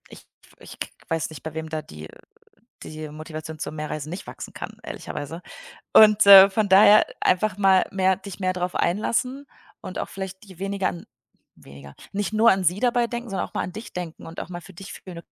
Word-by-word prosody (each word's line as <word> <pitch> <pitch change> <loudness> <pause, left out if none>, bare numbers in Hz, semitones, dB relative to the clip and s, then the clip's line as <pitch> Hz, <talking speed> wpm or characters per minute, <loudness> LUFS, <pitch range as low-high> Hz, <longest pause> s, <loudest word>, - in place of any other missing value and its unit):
Ich - - -14 0.3
ich - - -13
k - - -3 0.2
weiß 165 -1 -2
nicht, 155 -4 -11
bei 160 - -6
wem 160 0 -5
da 155 -1 -3
die 75 - -11
äh, - - -16 0.7
die 155 0 -7
Motivation 155 +1 -8
zum 155 - -5
Mehr-Reisen 155 -1 -5
nicht 180 +4 -7
wachsen - - -9
kann, - - -8
ehrlicherweise 150 +4 -7 0.5
und, 215 -1 +7
äh, 195 -1 +11
von 210 +1 0
daher 205 +2 +7 0.2
einfach 190 +1 +1
mal 190 -2 +4
mehr 190 -1 +2
dich 195 -1 -10
mehr 185 0 +1
drauf 180 0 -3
einlassen 250 +9 -1 0.4
und 185 - -7
auch - - -4
vielleicht 190 0 -7
dir 190 -4 -15
weniger 195 0 -1
an 170 - -9 0.5
weniger 70 0 -14 0.2
nicht 205 +1 -3
nur 225 +2 +5
an 190 0 0
sie 180 +4 +2
dabei 245 -1 +2
denken, 240 0 -6
sondern 195 - -2
auch - - -26
mal - - -1
an - - -6
dich 220 +5 -9
denken 175 -3 -7
und 165 - -8
auch - - -9
mal 175 -1 -7
für 190 - -14
dich 195 +3 -10
fühlen: 175 -3 -10
185 Hz, 210 wpm, -24 LUFS, 160-200 Hz, 0.7 s, äh